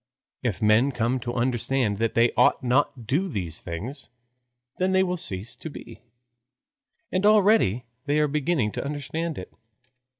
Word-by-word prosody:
If -, -, -2 dB
men 110 Hz, +6 st, +4 dB
come 125 Hz, +1 st, 0 dB
to 120 Hz, 0 st, -4 dB
understand 120 Hz, -3 st, 0 dB
that 115 Hz, 0 st, 0 dB
they 115 Hz, 0 st, +4 dB
ought 125 Hz, +2 st, +3 dB
not 140 Hz, +3 st, +2 dB
to 120 Hz, -, -12 dB
do 155 Hz, -, 0 dB
these 90 Hz, -, -2 dB
things, 115 Hz, -, -7 dB, 0.7 s
then 185 Hz, +1 st, +1 dB
they 190 Hz, 0 st, +4 dB
will 180 Hz, -1 st, -1 dB
cease 100 Hz, -, -5 dB
to 160 Hz, -, -7 dB
be. -, -, -11 dB, 1.1 s
And 185 Hz, +1 st, 0 dB
already 205 Hz, -, +4 dB, 0.2 s
they 145 Hz, +1 st, +2 dB
are 150 Hz, 0 st, +3 dB
beginning 145 Hz, -5 st, 0 dB
to -, -, -4 dB
understand 150 Hz, +3 st, -4 dB
it. 90 Hz, -, -8 dB
130 Hz, 160 wpm, -25 LUFS, 115-160 Hz, 1.1 s, men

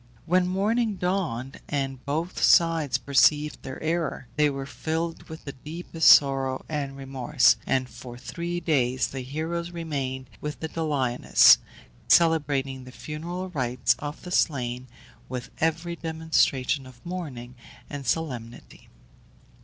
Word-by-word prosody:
When 180 Hz, +2 st, +3 dB
morning 210 Hz, +4 st, +1 dB
dawned, 175 Hz, -9 st, -2 dB
and 135 Hz, -2 st, -2 dB
both 160 Hz, +5 st, -2 dB
sides 165 Hz, -4 st, +4 dB
perceived 150 Hz, +2 st, +3 dB
their 130 Hz, -, -7 dB
error, 160 Hz, -4 st, -1 dB
they 150 Hz, 0 st, +4 dB
were 135 Hz, -1 st, -4 dB
filled 160 Hz, +4 st, -4 dB
with 160 Hz, 0 st, -9 dB
the 140 Hz, -, -4 dB
deepest 160 Hz, +4 st, 0 dB
sorrow 135 Hz, -2 st, +5 dB
and 140 Hz, -3 st, -3 dB
remorse; 130 Hz, -3 st, +3 dB
and 130 Hz, -1 st, +1 dB
for 120 Hz, -1 st, -10 dB
three 170 Hz, +7 st, -4 dB
days 130 Hz, -6 st, +1 dB
the 135 Hz, -, -5 dB
heroes 160 Hz, +6 st, -3 dB
remained 135 Hz, -7 st, -4 dB
with 150 Hz, -4 st, -5 dB
the 160 Hz, -, -3 dB
Doliones, 145 Hz, -7 st, +4 dB, 0.5 s
celebrating 140 Hz, -5 st, +3 dB
the 125 Hz, -, -11 dB
funereal 170 Hz, +7 st, -6 dB
rites 125 Hz, -6 st, +1 dB
of 145 Hz, 0 st, -6 dB
the 180 Hz, -, -8 dB
slain, 125 Hz, -7 st, 0 dB, 0.4 s
with 125 Hz, -2 st, -5 dB
every 165 Hz, +2 st, 0 dB
demonstration 160 Hz, -5 st, 0 dB
of 125 Hz, -2 st, -17 dB
mourning 145 Hz, -9 st, -6 dB, 0.3 s
and 140 Hz, -3 st, -7 dB
solemnity. 120 Hz, -7 st, -4 dB
145 Hz, 130 wpm, -26 LUFS, 130-165 Hz, 0.5 s, sorrow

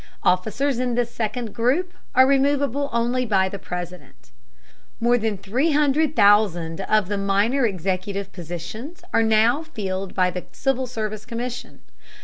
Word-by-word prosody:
Officers 225 Hz, +9 st, +1 dB
in 250 Hz, -2 st, 0 dB
this 235 Hz, -1 st, -1 dB
second 220 Hz, 0 st, -3 dB
group 280 Hz, +11 st, 0 dB, 0.2 s
are 260 Hz, +1 st, +7 dB
removable 280 Hz, 0 st, +1 dB
only 240 Hz, +2 st, 0 dB
by 195 Hz, -5 st, +2 dB
the 195 Hz, +1 st, -6 dB
President. 180 Hz, -5 st, -8 dB, 0.7 s
More 240 Hz, +1 st, +3 dB
than 220 Hz, -3 st, -1 dB
300,000 220 Hz, -, +2 dB
of 215 Hz, -1 st, +1 dB
the 205 Hz, 0 st, -2 dB
minor 205 Hz, +6 st, +2 dB
executive 195 Hz, +1 st, -3 dB
positions 180 Hz, -, -7 dB
are 230 Hz, -, +4 dB
now 225 Hz, +5 st, +3 dB
filled 195 Hz, -, -5 dB
by 185 Hz, -1 st, +2 dB
the 180 Hz, 0 st, -6 dB
Civil 265 Hz, +1 st, -1 dB
Service 215 Hz, -3 st, -4 dB
Commission. 240 Hz, +2 st, -6 dB
220 Hz, 130 wpm, -23 LUFS, 195-255 Hz, 0.7 s, are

